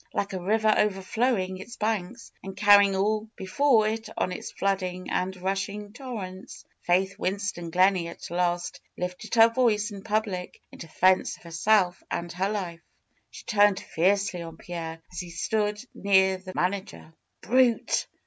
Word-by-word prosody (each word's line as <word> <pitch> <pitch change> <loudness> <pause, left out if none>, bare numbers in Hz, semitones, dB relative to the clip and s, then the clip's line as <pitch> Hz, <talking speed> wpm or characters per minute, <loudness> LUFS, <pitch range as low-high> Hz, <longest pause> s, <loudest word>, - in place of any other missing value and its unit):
Like 200 -1 -1
a 185 - -3
river 215 +3 +3
overfiowing 195 -1 0
its 235 +5 -10
hanks 220 +1 -2
and 195 0 -8
carrying 200 -1 +6
all 215 +3 0
be 190 - -7
fore 225 +1 +3
it 220 +1 -3
on 185 - 0
its 180 - -6
flooding 185 -2 -2
and 190 +1 -1
rushing 200 +2 -3
torrents. 215 -8 -8 0.2
Faith 190 +3 +1
Win 190 0 0
ston 195 -4 -4
Gleney 185 0 +3
at 170 - -9
last 175 0 -1 0.2
lifted 180 +5 -4
her 225 0 +8
voice 225 -3 +1
in 200 -1 -8
public 210 -4 -2
in - - -13
defense 185 +3 +2
of - - -22
herself 180 +2 +2
and 170 0 -3
her 190 +3 -1
life. 180 -5 -4 0.5
She - - -12
turned 205 -3 +4
fiercely 190 +1 0
on 165 -1 -8
Pierre, 165 -2 -7
as 175 - -6
he 180 -2 -6
stood 210 +4 -1
near 190 -1 +3
the 185 0 -9
manager. 185 -3 -3 0.3
''Brute! 250 -1 +2
195 Hz, 160 wpm, -26 LUFS, 180-210 Hz, 0.5 s, her